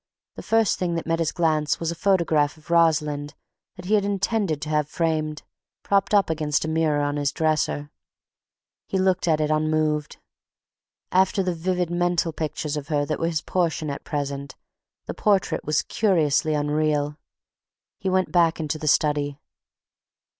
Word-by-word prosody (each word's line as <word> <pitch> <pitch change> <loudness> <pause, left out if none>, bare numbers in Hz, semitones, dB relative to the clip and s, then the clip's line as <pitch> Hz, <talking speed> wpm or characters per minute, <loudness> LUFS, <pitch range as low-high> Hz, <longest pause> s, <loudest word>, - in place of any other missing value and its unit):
The - - -8
first 225 -2 +2
thing 175 -2 -1
that 165 - -3
met 165 0 0
his 165 -2 0
glance 155 -3 +1
was 165 0 -1
a - - -5
photograph 165 -5 +2
of 155 +2 -13
Rosalind 150 -3 +2 0.4
that 180 -2 -10
he 205 - 0
had 210 -2 +4
intended 200 -4 0
to 150 - -5
have 150 -1 0
framed, 155 -2 -1 0.4
propped 200 +1 +2
up 200 -2 +4
against 155 -2 0
a - - -3
mirror 160 -2 +1
on 145 0 -1
his 145 -1 0
dresser. 155 -2 -1 1.0
He 195 - -1
looked 185 -1 +1
at 155 -2 +3
it 155 0 0
unmoved. 155 -1 0 0.9
After 190 +2 +3
the 180 -1 -1
vivid 180 +1 -1
mental 175 -1 0
pictures 155 -1 -3
of 145 -1 -5
her 145 -2 0
that 155 - -3
were 165 - 0
his 160 -2 -1
portion 165 -4 -1
at 140 - -6
present, 140 -2 -4 0.5
the - - -4
portrait 200 -3 +1
was 155 0 +1
curiously 160 -6 +1
unreal. 150 0 0 0.8
He 190 - -2
went 185 -3 +1
back 170 -1 +3
into 155 0 -3
the 155 - -5
study. 145 -1 +1
155 Hz, 165 wpm, -24 LUFS, 150-175 Hz, 1.0 s, had